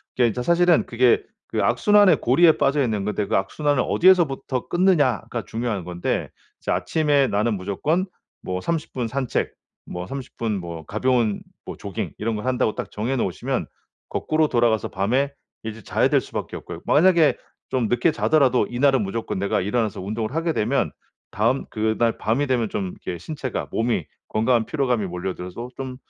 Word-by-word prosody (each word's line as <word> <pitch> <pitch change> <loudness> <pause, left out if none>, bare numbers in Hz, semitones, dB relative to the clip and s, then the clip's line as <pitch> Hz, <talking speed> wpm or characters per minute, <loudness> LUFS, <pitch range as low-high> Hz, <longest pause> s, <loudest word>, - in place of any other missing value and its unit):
그게 120 -2 +4
이제 125 +3 -2
사실은 170 +1 +4
그게 120 0 +3 0.3
그 - - -1
악순환의 205 -2 +5
고리에 160 +6 +5
빠져 140 +1 +2
있는 105 -5 -1
건데 105 -1 -1
그 - - -1
악순환을 145 +8 +1
어디에서부터 150 -8 +3
끊느냐가 145 - +2
중요한 110 -4 -2
건데 90 0 -2 0.3
이제 - - -2
아침에 145 -3 +2
나는 105 +2 +1
무조건 150 - -1 0.4
뭐 90 0 -3
30 165 - -2
분 125 -3 -2
산책, 130 +1 -1 0.4
뭐 90 +1 -5
30 135 +3 -8
분 110 -4 -1
뭐 85 -2 -7
가벼운 115 - +1 0.2
뭐 - - -6
조깅 - - -5
이런 110 +1 -1
걸 105 - -5
한다고 125 -4 +1
딱 - - -5
정해 115 +6 -2
놓으시면 95 - -2 0.4
거꾸로 155 0 +1
돌아가서 120 -5 +1
밤에 125 +9 0 0.3
이제 110 0 -6
자야 - - +1
될 - - +3
수밖에 - - -6
없고요. - - -8
만약에 165 -1 +5 0.3
좀 125 -4 0
늦게 120 +7 +3
자더라도 140 -5 +3
이날은 135 +1 +3
무조건 105 0 -3
내가 100 +1 0
일어나서 105 +1 -1
운동을 110 +6 -3
하게 165 0 0
되면 120 +4 0 0.4
다음 115 +6 +1
그날 110 +1 0
밤이 120 +7 0
되면 120 -4 +1
좀 100 -1 -2 0.2
이렇게 90 - -4
신체가 130 - -5
몸이 115 -7 0 0.2
건강한 115 +1 +2
피로감이 125 -7 0
몰려들어서 90 +5 -5
좀 130 -1 -5
120 Hz, 365 characters per minute, -23 LUFS, 105-140 Hz, 0.4 s, 악순환의